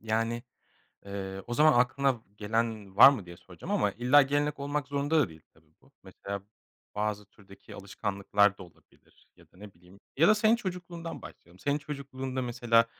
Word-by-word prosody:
yani, 115 +2 -1 0.6
eee, 95 -1 -6
o 120 - -3
zaman 155 +4 +5
aklına 130 0 +1 0.2
gelen 110 -2 -2
var 120 - +11
mı 125 -9 -3
diye 85 0 -11
soracağım 95 - -8
ama 205 - +1
illa 125 +4 +5
gelenek 145 +1 0
olmak 145 0 -3
zorunda 145 +3 +1
da 125 - +1
değil 80 -1 -15
tabii - - -28
bu. - - -25
Mesela 100 0 -7 0.5
bazı 105 0 -2
türdeki 100 0 -16
alışkanlıklar 100 0 0
da - - -9
olabilir 85 -4 -23
ya - - -20
da - - -23
ne 100 0 -12
bileyim 90 +3 -20 0.2
ya 165 +4 +5
da 215 - +6
senin 215 +2 +4
çocukluğundan 175 -5 -6
başlayalım. 85 +2 -14
Senin 140 +5 0
çocukluğunda 135 -3 -5
mesela 120 -1 +2
120 Hz, 170 wpm, -29 LUFS, 100-145 Hz, 0.6 s, var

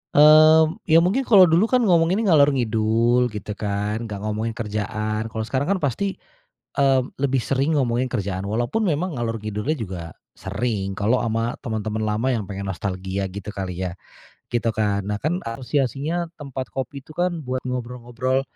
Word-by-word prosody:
Mmm, 155 +2 +7
ya, 165 +1 +6
mungkin 240 +9 +1
kalau 200 -5 +8
dulu, 175 +6 +4
kan, 250 0 +2
ngomonginnya 185 +2 +3
ngalor-ngidul, 120 -4 +3
gitu, 105 -2 -6
kan. 105 +2 -2
Enggak 100 -2 -6
ngomongin 110 +2 -2
kerjaan, 110 0 -3
kalau 110 0 -4
sekarang, 130 +6 -1
kan, - - -3
pasti, 190 +9 -1 0.6
eee, 135 -2 +4
lebih 135 -1 +1
sering 135 +5 0
ngomongin 125 0 0
kerjaan. 100 -5 -2
walaupun 120 - -1
memang 170 -1 -1
ngalor-ngidul-nya 115 +2 -2
juga 95 -6 -5 0.3
sering. 100 0 -2
Kalau 110 +6 +1
sama 115 +1 -1
teman-teman 110 -1 -2
lama 110 +4 0
yang 110 - -2
pengen 100 0 -6
nostalgia, 95 0 -3
gitu 100 +1 -8
kali, 95 -1 -3
ya, 85 - -9 0.6
gitu, 120 -1 0
kan. 100 -2 0
Nah, 105 - -1
kan, 170 +5 0
asosiasinya 140 +7 -1
tempat 135 -3 -6
kopi 135 +2 -4
itu, 155 - -13
kan, 175 -1 0
buat 130 0 -2
ngobrol-ngobrol, 125 +1 -2
120 Hz, 155 wpm, -23 LUFS, 105-145 Hz, 0.6 s, kalau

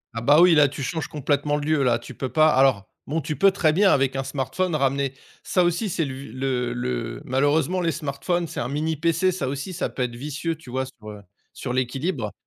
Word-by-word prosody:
Ah, 115 - -3
bah, 145 +6 +5
oui, 180 -1 +7
là 150 -2 +6
tu 140 0 -6
changes 160 +2 -3
complètement 145 0 0
le 145 0 -3
lieu 155 -2 +2
là, 120 -2 +3
tu 125 +2 -10
peux 130 +2 -4
pas 155 0 +4
alors, 130 -8 +3 0.2
bon, 155 +4 -1
tu 150 0 -3
peux 195 - +5
très 160 -5 +2
bien 195 +2 +4
avec 135 -1 +2
un 135 - -1
smartphone 145 +6 -2
ramener 140 -1 0 0.3
ça 180 - +1
aussi 175 +5 0
c'est 165 -2 -1
le 135 - -5
v 135 +1 -8
le 125 -1 -2
le 120 -1 -3
malheureusement 145 +7 +1
les 170 -1 +1
smartphones, 155 +4 -2
c'est - - -6
un 120 - -2
mini 155 +3 -1
PC, 165 +4 +1
ça 175 -7 -3
aussi 140 +7 -4
ça - - -2
peut 125 - -3
être 120 -1 -3
vicieux, 150 +5 -3
tu 150 -5 -15
vois, 130 +1 -2
sur, 110 -4 -12
heu, 105 -1 -10 0.3
sur 125 - -5
l'équilibre. 130 - -2
140 Hz, 235 wpm, -24 LUFS, 130-160 Hz, 0.3 s, oui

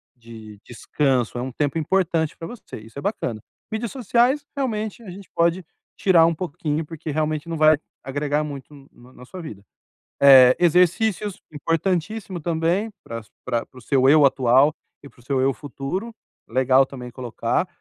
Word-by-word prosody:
de 110 -3 -12
descanso. 125 -1 -1
É - - -2
um 130 +1 -4
tempo 145 +4 -1
importante 165 -1 0
pra 165 - -7
você. 240 - -10
Isso 115 +4 -14
é - - -7
bacana. 125 - -3 0.3
Mídias 220 +1 -3
sociais, 250 +2 +1
realmente, 220 -4 -3
a 195 - -10
gente 195 0 -12
pode 170 +2 +2 0.3
tirar 170 -4 +5
um 165 - +2
pouquinho, 155 -2 -3
porque 160 -1 -7
realmente 155 +1 -2
não 165 - -3
vai 155 -1 +5 0.3
agregar 145 +2 -1
muito 140 0 -8 0.2
no 125 +1 -18
na 125 - -14
sua 185 +5 -9
vida. 105 -11 -9 0.6
Eh, 130 -2 +8
exercícios, 180 +4 +2
importantíssimo 175 +5 -2
também 170 +6 0
pra 115 0 -6
su - - -26 0.2
pra 120 -2 -1
pra 130 - -21
o - - -15
seu 135 +2 +3
eu 150 -1 +6
atual 135 +2 +4 0.3
e 140 - -10
para - - -25
o 120 - -19
seu 135 0 -1
eu 135 +1 +2
futuro. 150 - -5 0.4
Legal 130 +2 +4
também 125 -2 -9
colocar. 125 -2 -2
150 Hz, 170 wpm, -22 LUFS, 130-180 Hz, 0.6 s, Eh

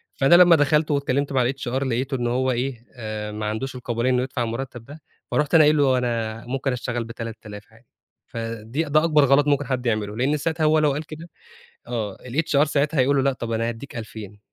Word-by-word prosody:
فأنا 140 +5 +5
لما 175 -1 +8
دخلت 150 +1 +2
واتكلمت 140 0 0
مع 130 -1 +2
الHR 135 -2 -8 0.2
لقيته 130 +1 -1
إن 120 -1 -1
هو 130 +2 +1
إيه؟ 125 -1 -3
آآ 110 -2 -5
ما 105 0 -5
عندوش 110 +5 -3
القابلية 120 0 -2
إنه 125 0 +2
يدفع 130 -2 -3
المرتب 120 0 -5
ده، 150 +2 -12 0.3
فرُحت 150 +2 +1
أنا 160 - +8
قايل 150 +1 +4
له 135 -3 +3
أنا 115 -2 -2
ممكن 135 +2 -2
أشتغل 120 -1 -3
ب3000 115 -1 -8 0.2
آلاف 110 - -28
عادي. 115 +2 -22 0.4
فدي 115 +5 -4
ده 155 +1 +2
أكبر 150 -3 +4
غلط 140 +2 +4
ممكن 145 -1 +2
حد 130 -1 -3
يعمله، 110 -2 -1
لإن 140 +5 +1
ساعتها 160 +2 -2
هو 155 0 +4
لو 150 -1 +3
قال 150 +3 -3
كده 160 +3 -10 0.6
آه 110 -5 -4
الHR 140 +2 +1
ساعتها 150 0 0
هيقول 140 +3 +3
له 135 - +3
لأ 140 -1 +2
طب 120 -2 -6
أنا 115 +1 0
هاديك 120 +3 -7
2000 105 -2 -8
130 Hz, 210 wpm, -23 LUFS, 115-145 Hz, 0.6 s, لما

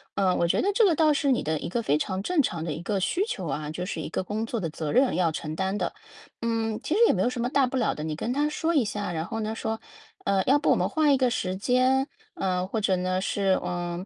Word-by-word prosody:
呃， 185 -2 +2
我 170 - +2
觉 - - +2
得 405 - +2
这 445 +1 +5
个 360 - +4
倒 310 0 +4
是 280 -1 +1
你 250 - +2
的 155 0 -1
一 - - -5
个 235 +7 -1
非 150 -9 +2
常 190 +4 -2
正 335 - +2
常 170 -9 -2
的 160 - -3
一 160 - -6
个 200 +2 -1
需 345 - 0
求 185 - -4
啊， 150 +1 -3
就 180 +3 -4
是 170 - -4
一 - - -4
个 180 - -2
工 215 +3 -3
作 230 0 -3
的 170 -5 -2
责 155 -1 -4
任 260 -4 +3
要 175 -2 +2
承 155 0 -5
担 190 +3 -1
的。 - - -1 0.5
嗯， 225 -2 -1
其 - - -1
实 405 - +2
也 - - +4
没 185 - 0
有 - - +2
什 245 - -3
么 245 - 0
大 275 0 +3
不 260 - -5
了 240 - +1
的， 150 - -5
你 155 -1 -3
跟 225 +9 -3
他 290 +2 +1
说 325 +2 -1
一 265 -7 +3
下， 205 -2 -3
然 160 -1 -2
后 225 - -4
呢， 220 0 -2
说， 220 0 -3 0.5
呃， 195 -1 +2
“要 275 +3 +5
不 - - +1
我 - - +5
们 - - +1
换 310 -2 +3
一 270 - +4
个 255 -1 +2
时 185 -4 -1
间？”， 255 +6 +2 0.3
呃， 185 -1 0
或 220 - -2
者 195 -2 +2
呢， 185 +1 0
是， 195 -1 +1
呃， 175 0 -3
200 Hz, 310 characters per minute, -26 LUFS, 175-255 Hz, 0.5 s, 这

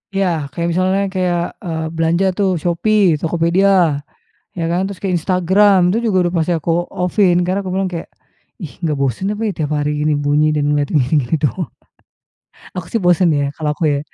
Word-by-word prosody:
Iya 195 -1 +2 0.2
kayak 170 +4 -2
misalnya 185 +3 +1
kayak, 180 -2 0 0.3
eee, 160 -2 -3
belanja 165 +3 +1
tuh 200 -2 +2
Shopee, 175 -1 +2
Tokopedia, 170 +4 +1 0.9
ya - - -1
kan, 175 - +1
terus 195 -2 -7
kek 195 - -2
Instagram 190 +4 +3
itu 200 - +1
juga 195 -4 +1 0.2
masih 165 +2 +1
aku - - -5 0.3
off-in 180 0 +2
karena 185 +2 0
aku 185 - -3
bilang 190 0 -1
kayak, 170 - -5 0.5
"Ih 160 -6 -7
nggak 155 -4 -1
bosan 140 - -1
apa 210 - -7
ya - - -1
tiap 155 -3 -2
hari 145 0 -1
gini 150 +1 +1
bunyi 145 +1 +2
dan 150 - 0
ngeliat 145 -1 0
gini-gini 145 0 +1
doang?" 145 -7 -1 1.1
Aku 180 -3 -4
sih - - +1
bosan 175 0 +4
ya, 145 - +1
kalau 155 -2 -2
aku - - -5
ya. 140 - -1
175 Hz, 185 wpm, -17 LUFS, 155-190 Hz, 1.1 s, bosan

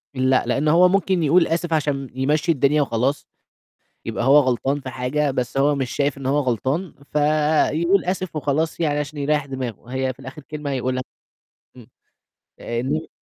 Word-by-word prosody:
لأ، 130 0 +2
لإن 135 +5 0
هو 170 +4 +6
ممكن 190 -2 +1
يقول 165 +4 +4
آسف 165 0 -1
عشان 140 -4 -1
يمشّي 150 +5 +1
الدنيا 145 0 +2
وخلاص، 130 +2 -1 0.8
يبقى - - -3
هو 140 +3 +7
غلطان 135 +1 0
في 130 - -7
حاجة، 130 +3 -1
بس 125 0 -3
هو 145 +2 +3
مش 135 -3 -3
شايف 140 -1 0
إن 135 - -8
هو 140 +3 +2
غلطان، 135 - -1 0.2
فيقول 155 +4 +2
آسف 185 -2 -3
وخلاص 155 +2 -1
يعني 150 -3 +1
عشان 150 +1 -5
يريّح 145 0 0
دماغه، 130 -5 -6
هي 130 0 -1
في - - -32
الآخِر 135 +4 -9
كلمة 150 0 -6
هيقولها. 130 -1 -2 0.7
إمم. 120 -4 -14 0.7
آآ 115 0 -3
إن 145 +6 -2
145 Hz, 170 wpm, -22 LUFS, 130-155 Hz, 0.8 s, هو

